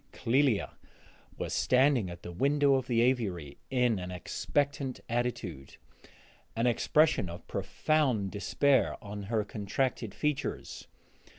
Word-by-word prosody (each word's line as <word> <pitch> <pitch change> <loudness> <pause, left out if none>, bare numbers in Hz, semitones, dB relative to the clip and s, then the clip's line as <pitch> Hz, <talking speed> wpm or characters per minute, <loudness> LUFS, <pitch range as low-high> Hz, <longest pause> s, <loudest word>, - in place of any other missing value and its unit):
Clélia 125 -2 +2 0.7
was - - -3
standing 130 -6 +3
at 85 0 -9
the 85 - -6
window 140 +8 +3
of 130 -1 +1
the 115 -2 +2
aviary 100 - 0
in 125 -5 +2
an 90 0 -5
expectant 135 - -2
attitude, 115 - -3 0.8
an 115 +1 +1
expression 125 - +3
of 85 +1 -9
profound 130 -11 0
despair 125 +3 +2
on 105 0 -6
her 110 -2 +1
contracted 110 +1 -2
features. 150 -2 -3
120 Hz, 115 wpm, -30 LUFS, 100-135 Hz, 0.8 s, standing